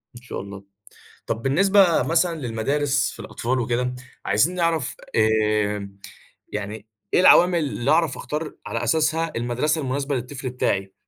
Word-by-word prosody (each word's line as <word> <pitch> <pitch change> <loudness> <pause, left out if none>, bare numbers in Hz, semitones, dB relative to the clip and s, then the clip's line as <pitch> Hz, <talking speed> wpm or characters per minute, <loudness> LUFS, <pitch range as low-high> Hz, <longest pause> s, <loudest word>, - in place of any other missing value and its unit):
إن 120 - -11
شاء 125 - -6
الله. 100 0 -9 0.6
طب 115 - -2
بالنسبة 185 - +4
مثلًا 165 +1 +1
للمدارس 140 +4 0
في - - -14
الأطفال 130 +2 -2
وكده، 125 +1 -1 0.3
عايزين 160 +12 +2
نعرف، 165 -5 0 0.2
آآ، 105 -2 +1 0.6
يعني، 105 +1 -5 0.3
إيه - - +5
العوامِل 180 -1 +6
اللي 140 -3 -1
أعرف 160 -3 +2
أختار 150 +4 -4
على 115 +1 -3
أساسها 160 +5 +1
المدرسة 125 +7 0
المناسبة 140 +1 -2
للطفل 130 +1 -5
بتاعي؟ 95 -6 -1
130 Hz, 135 wpm, -23 LUFS, 115-155 Hz, 0.6 s, العوامِل